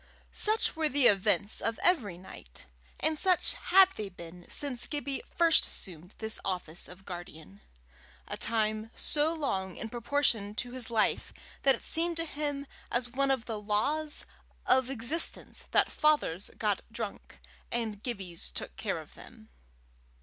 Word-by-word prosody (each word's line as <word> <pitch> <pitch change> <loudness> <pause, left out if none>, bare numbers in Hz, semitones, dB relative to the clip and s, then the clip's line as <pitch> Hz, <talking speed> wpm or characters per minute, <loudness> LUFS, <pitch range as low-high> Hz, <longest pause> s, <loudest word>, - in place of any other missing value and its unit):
Such 435 +1 +3
were 315 -1 0
the 280 -1 +3
events 200 0 +4
of 225 0 -2
every 240 - +2
night, 175 - -12 0.3
and 315 -1 0
such 370 -2 +3
had 380 +1 +5
they 210 -2 -5
been 175 -1 -12
since 270 -4 +5
Gibbie 285 -3 -3
first 335 -1 +4
assumed 180 +1 -5
this 220 0 +6
office 180 -3 -4
of 185 +2 -14
guardian 160 - -10 0.7
a - - -5
time 215 -1 -1
so 300 +1 +2
long 195 - -3
in 225 - -6
proportion 235 -3 0
to 245 +2 -4
his 255 -1 0
life 225 -2 0 0.3
that 270 -1 +5
it - - -13
seemed 335 +1 +2
to 330 - -1
him 290 -2 -4 0.2
as 245 0 -1
one 275 +2 0
of 260 -3 0
the 220 -3 -5
laws 290 +9 -1 0.4
of 260 0 +3
existence 270 +6 -1
that - - +2
fathers 290 - +1
got 210 -3 0
drunk 225 -3 -7 0.3
and 220 -4 -3
Gibbies 190 -9 -4
took - - -6
care - - -2
of - - -11
them. 220 -2 -15
235 Hz, 150 wpm, -30 LUFS, 200-290 Hz, 0.7 s, this